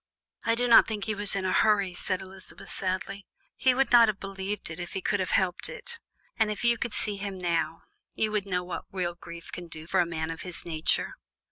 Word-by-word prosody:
"I 230 0 +2
do 245 +1 +1
not 235 - +8
think 215 -3 -3
he 220 - -1
was 205 -1 +1
in 195 -1 -1
a 185 - +1
hurry," 200 -4 +3
said 185 +1 -1
Elizabeth 190 0 -10
sadly; 195 +1 -3 0.3
"he 260 -1 +3
would 270 +1 +2
not 235 -2 +8
have 210 -2 -1
believed 195 -1 -4
it 160 - -7
if 175 -1 -6
he - - -1
could 205 +2 0
have 185 - -1
helped 185 -2 +1
it, - - -8 0.4
and 220 -1 +4
if 210 +1 -4
you 235 0 +4
could 240 - -2
see 205 -2 0
him 195 -1 -4
now, 165 -2 -1 0.3
you 215 -1 +1
would 205 -2 -1
know 180 -2 0
what 180 0 -5
real 180 -2 -1
grief 170 -1 -10
can 175 -1 -7
do 155 -1 -8
for - - +1
a 175 - +4
man 160 -1 -3
of 165 - -6
his 180 -2 0
nature." 160 -2 +1
195 Hz, 235 wpm, -28 LUFS, 175-215 Hz, 0.4 s, not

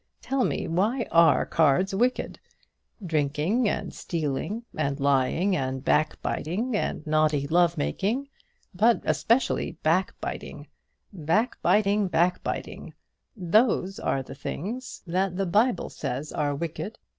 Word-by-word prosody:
Tell 270 -1 -1
me - - -1
why 210 +9 0
are 165 -1 +5
cards 165 +4 +2
wicked? 245 +6 0 0.7
Drinking, 160 - +1
and - - -3
stealing, 165 - -3
and 140 -2 -1
lying, 140 +8 +2
and 130 -2 -3
backbiting, 175 - 0
and 180 - -2
naughty 155 -2 +2
love 170 +2 +2
making, 215 - -1 0.5
but 220 +6 +3
especially 235 +4 +1
backbiting 175 +4 -2 0.5
backbiting 205 - +1
backbiting, 175 0 -1 0.4
those 195 +1 +2
are 135 - -1
the 135 - -10
things 230 - -6
that 180 +1 -1
the 195 - 0
Bible 215 +7 +1
says 135 +2 -4
are 145 -1 -1
wicked. 170 +8 -5
175 Hz, 110 wpm, -26 LUFS, 150-210 Hz, 0.7 s, are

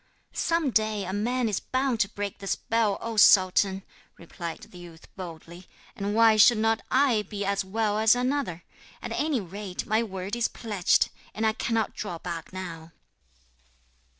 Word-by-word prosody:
'Some 330 -5 0
day 215 -2 0
a 185 - -4
man 240 +4 0
is 210 - -1
bound 260 -2 -1
to 195 -3 +2
break 205 -1 -5
the 195 - -8
spell, 220 0 0
O 230 -1 -5
sultan,' 190 -1 +5 0.3
replied 170 0 -7
the 180 - -12
youth 170 -2 -13
boldly; 175 -1 -9 0.3
'and 205 +1 -3
why 225 -1 +5
should 225 +2 +7
not 225 +1 +1
I 260 -5 +3
be 205 0 -9
he - - -1
as 200 0 0
well 210 +2 -1
as 220 +1 +5
another? 250 - -2 0.4
At - - -5
any 295 -4 0
rate, 190 0 -6
my 215 +1 +2
word 195 -1 -4
is 235 -1 +1
pledged, 210 -6 +1 0.3
and 220 - -1
I 220 - +3
cannot 225 -1 -1
draw 190 -5 -5
back 165 -1 -6
now.' 170 -3 -8
210 Hz, 170 wpm, -27 LUFS, 185-225 Hz, 0.4 s, should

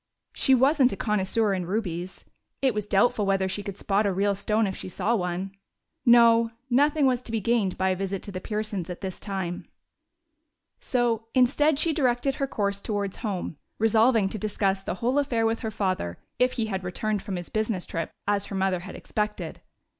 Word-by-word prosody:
She 265 - +4
wasn't 265 0 +4
a 195 - -4
connoisseur 210 +1 +1
in 180 -2 -2
rubies; 185 -3 -3 0.3
it 265 -3 +2
was 210 -1 -3
doubtful 215 +3 +3
whether 195 -1 +1
she 190 +2 -3
could 200 -1 -6
spot 205 +1 +1
a - - +1
real 200 +2 +1
stone 210 +2 +1
if 190 -2 -3
she - - -7
saw 215 +5 0
one. 180 -2 -2 0.6
No, 230 -1 +6 0.2
nothing 290 +3 +4
was 255 -2 +2
to 240 - -8
be 225 - 0
gained 215 -3 +1
by 190 0 +1
a 185 - +1
visit 195 0 -3
to 200 - -6
the 185 -1 -5
Pearsons' 210 -4 -3
at 180 - -6
this 190 -2 -5
time. 190 -4 -4 1.1
So 235 -3 0
instead 275 +4 +4
she 325 +2 +1
directed 265 -2 +1
her 275 - +2
course 200 -5 -1
towards 200 -3 -2
home, 190 - -4 0.2
resolving 225 -1 +4
to 215 - -5
discuss 195 -1 0
the 190 - -3
whole 250 +8 +1
affair 240 -6 +1
with 225 0 +1
her 220 - -3
father, 185 - -2 0.2
if 250 0 +3
he 230 - -1
had 190 -3 -3
returned 205 +3 -2
from 195 -2 -4
his 175 -1 -5
business 215 -4 -1
trip, 165 -1 -3 0.2
as 205 -1 +1
her 200 - -6
mother 190 -1 +1
had 185 +2 -9
expected. 210 0 -3
210 Hz, 195 wpm, -26 LUFS, 190-235 Hz, 1.1 s, No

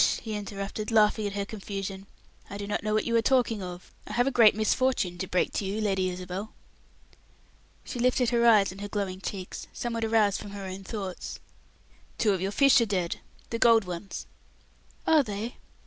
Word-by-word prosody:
he 220 - -4
interrupted, 205 +1 -4
laughing 215 -1 +3
at 200 - -5
her 200 0 -2
confusion. 195 -2 -6 0.4
"I 200 - -6
do 205 - -5
not 205 - -2
know 215 - -2
what 215 - +1
you 235 - 0
are - - +4
talking 235 -3 +2
of. 180 -1 -8
I - - -6
have 245 +2 +3
a 275 - +1
great 230 -5 +6
misfortune 215 -5 +1
to 190 - -3
break 180 - 0
to - - -1
you, 195 +2 -2
Lady 190 -3 +1
Isabel." 185 +3 -6 1.3
She 245 - -6
lifted 250 0 +2
her 235 -1 +3
eyes 210 -4 +6
and 195 +2 -10
her 205 - -4
glowing 195 -2 -3
cheeks, 190 -2 -6
somewhat 230 -1 -3
aroused 220 -3 +3
from 205 -1 -9
her 200 -1 -6
own 190 +1 -6
thoughts. 195 -3 -5 0.8
"Two 210 -3 +3
of 185 - -2
your 190 - 0
fish 275 +4 +5
are 230 - +1
dead. 185 -4 -1 0.3
The 230 - -2
gold 230 -2 +6
ones." 180 +2 -6 0.8
"Are 315 -2 +6
they?" 220 -1 -5
205 Hz, 195 wpm, -28 LUFS, 195-225 Hz, 1.3 s, great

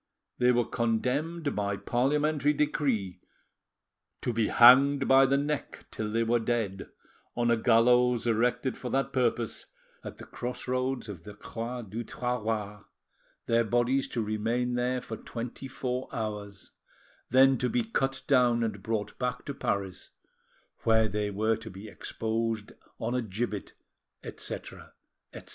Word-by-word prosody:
They 125 0 +5
were 120 -1 +2
condemned 140 +8 -1
by 100 -1 -1
parliamentary 145 +7 +1
decree 135 -11 -1 1.0
to 120 - -1
"be 115 -1 +1
hanged 135 +3 +7
by 135 0 +6
the 135 +1 +3
neck 145 +1 -3
till 110 -1 -3
they 115 +1 +1
were 120 +1 +2
dead, 110 -5 -2 0.5
on 120 0 +2
a - - +5
gallows 120 +1 +4
erected 125 +2 +1
for 125 - -5
that 135 +2 0
purpose 120 -3 0 0.4
at - - -8
the - - -10
cross 125 +1 -6
roads 130 -1 -1
of 95 -6 -8
the 105 +2 -10
Croix 120 +3 -5
du 110 +3 -5
Trahoir; 110 -4 -3 0.6
their 115 0 +3
bodies 120 +4 +1
to 115 - -2
remain 115 +4 -1
there 125 +1 0
for 110 -2 -6
twenty 120 +3 -7
four 130 -1 -3
hours, 105 -4 -5 0.6
then 130 0 +5
to 125 - 0
be 245 - +1
cut 135 -12 -1
down 125 -4 +3
and 105 -3 -3
brought 105 0 -3
back 125 -1 -2
to 140 - -4
Paris, 100 -7 -3 0.7
where 110 -1 +3
they 105 0 -2
were 110 +3 +1
to 110 0 -9
be 100 +2 -10
exposed 110 0 -3 0.3
an 120 - -2
a 125 - +1
gibbet," 105 -1 -4 0.5
etc., - - -8 0.4
etc. - - -11
120 Hz, 145 wpm, -29 LUFS, 110-130 Hz, 1.0 s, hanged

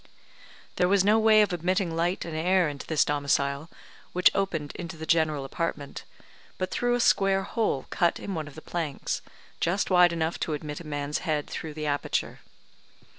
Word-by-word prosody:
There 180 - +3
was 195 0 +4
no 215 +2 +5
way 215 -1 +6
of 205 - -1
admitting 175 0 0
light 175 +3 0
and 165 -2 -5
air 180 +2 +3
into 145 -2 -6
this 160 -2 +3
domicile, 140 +1 0 0.4
which 180 0 +5
opened 170 -7 -1
into 170 -2 -7
the 160 - -6
general 155 -4 +1
apartment, 145 -1 -4 0.5
but 185 - -3
through 245 0 +1
a - - -1
square 195 -4 +3
hole 200 - -1
cut 170 -1 +1
in 200 - -5
one 155 -3 -4
of 145 - -12
the 160 - -10
planks, 160 -5 -3 0.4
just 190 +3 0
wide 180 -1 +6
enough 165 0 -2
to 160 - -2
admit 150 0 -5
a 170 - -10
man's 145 0 -2
head 150 -2 -1
through 155 -2 -6
the 155 -1 -4
aperture. 145 -1 -1
165 Hz, 180 wpm, -27 LUFS, 150-185 Hz, 0.5 s, way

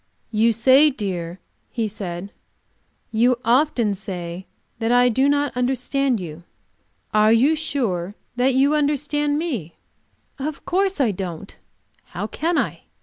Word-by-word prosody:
"You 225 +1 +3
say, 260 +7 +5
dear," 185 - -4 0.3
he 230 -3 -2
said, 195 -2 -6 0.8
"you 240 +3 +3
often 240 -3 +2
say, 180 -1 -6 0.3
that 225 0 0
I 245 0 +5
do 265 +4 +2
not 285 -1 +1
understand 255 0 0
you. 170 -2 -8 0.7
Are 215 +1 +5
you 260 +8 +4
sure 215 - -2 0.2
that 255 +1 +2
you 275 +3 +4
understand 295 0 +1
me?" 250 - -3 0.6
Of 290 +2 -5
course 385 -1 0
I 250 -6 +3
don't. 185 -1 -6 0.5
How - - -5
can 335 +1 -1
I? - - -1
245 Hz, 130 wpm, -22 LUFS, 200-285 Hz, 0.8 s, say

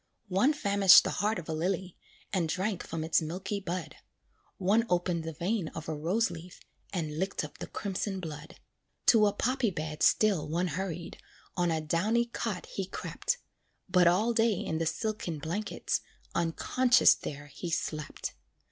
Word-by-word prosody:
One 195 +10 +4
famished 200 -8 +7
the - - -2
heart 210 +1 +1
of 170 - -7
a 160 - -2
lily, 180 +2 -2 0.4
And 175 -5 +1
drank 190 +3 -1
from 160 -1 -4
its 160 +2 +2
milky 190 +6 -3
bud; 175 -5 -5 0.6
One 205 +5 +3
opened 175 -1 +1
the 160 - -4
vein 185 +2 -1
of 160 - -6
a 160 - -2
rose 175 +8 0
leaf, 170 +1 -10 0.3
And 155 -5 -3
licked 190 +2 -1
up - - -9
the - - -5
crimson 195 -1 -3
blood. 155 -3 -8 0.5
To 215 -3 +6
a - - +2
poppy 245 +3 +1
bed 155 -3 -5
still 190 -9 +3
one 175 +3 0
hurried, 170 0 -4 0.4
On 175 -1 +1
a 160 -1 0
downy 205 +10 +1
cot 235 - -4
he - - -4
crept, - - -2 0.5
But 180 -1 +5
all 210 +7 +3
day 225 -1 +3
in 160 -2 -2
the 165 - 0
silken 210 -4 -2
blankets, 170 +9 -2 0.3
Unconscious 245 +10 +4
there 145 0 -7
he 145 +5 -7
slept. 155 -2 -3
180 Hz, 165 wpm, -30 LUFS, 160-205 Hz, 0.6 s, famished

